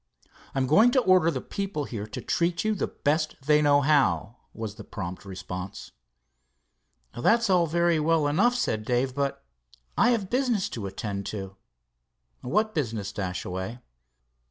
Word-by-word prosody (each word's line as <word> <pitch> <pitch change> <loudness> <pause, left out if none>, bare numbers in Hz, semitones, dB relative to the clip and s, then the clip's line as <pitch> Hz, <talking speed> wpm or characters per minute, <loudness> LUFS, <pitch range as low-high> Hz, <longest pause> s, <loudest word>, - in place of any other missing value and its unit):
"I - - -2
am 130 - +2
going 210 - +6
to 260 - +4
order 185 -5 +4
the - - -2
people 195 -6 -3
here 110 -6 -5
to - - -6
treat 170 0 0
you 215 - +2
the 200 - -1
best 155 +2 -1
they 150 0 +5
know 145 -1 +4
how," 125 - +2
was 110 -2 -6
the - - -10
prompt 95 -2 -7
response. 95 0 -7 1.2
"That's 225 - +3
all 175 -2 +4
very 170 0 +2
well 155 -1 +2
enough," 205 +12 +3
said 110 - -1
Dave, 125 +3 0
"but 140 - -2 0.5
I - - +4
have 225 -6 +1
business 245 -6 +1
to 105 -4 -5
attend 100 0 -5
to." 95 -2 -6 0.9
"What 215 - 0
business, 110 -9 -2
Dashaway?" 95 +3 -4
145 Hz, 155 wpm, -27 LUFS, -, 1.2 s, going